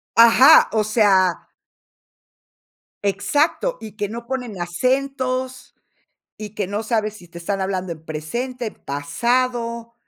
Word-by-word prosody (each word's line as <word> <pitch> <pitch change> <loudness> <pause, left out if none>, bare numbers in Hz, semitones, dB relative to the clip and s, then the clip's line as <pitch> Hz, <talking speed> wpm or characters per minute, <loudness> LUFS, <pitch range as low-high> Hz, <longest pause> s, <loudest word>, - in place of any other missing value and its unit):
Ajá, 235 +6 +7
o 220 -1 +1
sea 200 -5 +2 1.6
Exacto, 300 - 0
y 215 -1 -10
que 205 -1 -2
no 235 +3 -7
ponen 240 -7 -5
acentos, 255 +6 -2 0.6
y 210 -2 -7
que 205 -3 -3
no 205 +3 -3
sabes 215 -2 -1
si 175 - -15
te 170 0 -11
están 195 +3 -3
hablando 185 -2 -2
en 160 -1 -9
presente, 235 +12 -4
en - - -8
pasado, 235 - -2
220 Hz, 125 wpm, -21 LUFS, 190-255 Hz, 1.6 s, Ajá